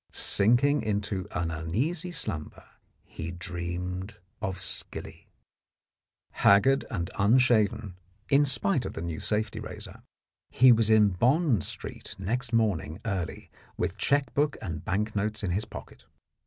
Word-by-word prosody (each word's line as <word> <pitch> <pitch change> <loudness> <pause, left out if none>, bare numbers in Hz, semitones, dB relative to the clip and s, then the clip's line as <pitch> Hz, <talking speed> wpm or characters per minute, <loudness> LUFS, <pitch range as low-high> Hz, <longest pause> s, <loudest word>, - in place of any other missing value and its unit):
Sinking 120 +8 +3
into 100 -3 -2
an 85 -2 -2
uneasy 120 - -2
slumber, 115 - -5 0.4
he 80 +1 -7
dreamed 90 +2 -4 0.3
of 95 -3 -3
skilly. 90 - -3 1.0
Haggard 130 +8 +4
and 95 -8 -3
unshaven 110 -3 +3 0.3
(in 140 +1 +5
spite 130 -3 +1
of - - -5
the 80 - -5
new 85 -2 -4
safety 105 0 -1
razor), - - -9 0.5
he 130 0 +6
was 115 -2 +4
in 110 -2 +6
Bond 120 - +2
Street - - -5
next 115 +6 -2
morning 100 -8 0
early, 95 -6 -4 0.3
with - - -1
cheque 140 -3 +1
book 145 0 +1
and 80 -7 -5
bank 105 +4 -1
notes 105 +2 -1
in 95 - -1
his 100 +5 -1
pocket. 110 - -11
105 Hz, 130 wpm, -28 LUFS, 90-125 Hz, 1.0 s, he